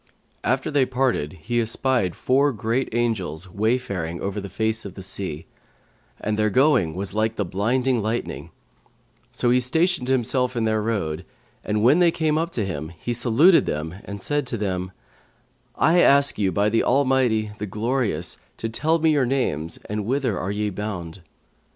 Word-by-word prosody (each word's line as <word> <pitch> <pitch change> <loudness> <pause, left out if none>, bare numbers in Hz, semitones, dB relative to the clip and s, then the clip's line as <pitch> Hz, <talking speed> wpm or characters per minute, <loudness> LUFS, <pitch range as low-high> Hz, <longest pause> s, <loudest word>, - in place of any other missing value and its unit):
After 130 +3 0
they 140 -3 +3
parted 125 - 0
he 120 +1 0
espied 115 -4 0
four 140 +3 +2
great 120 +2 -1
Angels 95 -8 -1
wayfaring 100 -5 -1
over 100 +1 -3
the 100 - -7
face 110 +3 -1
of 95 -2 -8
the 95 - -8
sea, 95 -5 -4 0.7
and 105 0 -2
their 110 0 +3
going 105 - +3
was 95 0 -3
like 110 +1 0
the 105 - -1
blinding 120 +7 0
lightning; 110 +3 -3 0.8
so 120 0 +1
he 125 - +4
stationed 160 +2 +1
himself 125 0 +1
in 115 -2 0
their 110 -1 +1
road, 95 -7 -2 0.4
and 105 0 -1
when 140 +8 +5
they 175 -1 +5
came 155 -2 0
up 165 +1 -1
to 110 - -1
him, 80 -4 -4
he 120 - -3
saluted 130 +10 +4
them 75 +2 -3
and 100 0 -7
said 145 -2 -1
to 120 - -3
them, 95 -3 -2 0.8
'I 170 +3 +4
ask 140 -4 +4
you 95 -2 +2
by 100 +4 +1
the 115 +2 +2
Almighty, 130 -5 +2
the 105 - -3
Glorious, 105 - -1 0.2
to 115 - -3
tell 160 +8 +1
me 160 -1 +3
your 140 -4 +2
names 85 - -1
and 105 0 -3
whither 130 -4 0
are 95 - -3
ye 105 0 -1
bound?' 90 -4 -5
110 Hz, 170 wpm, -23 LUFS, 100-130 Hz, 0.8 s, when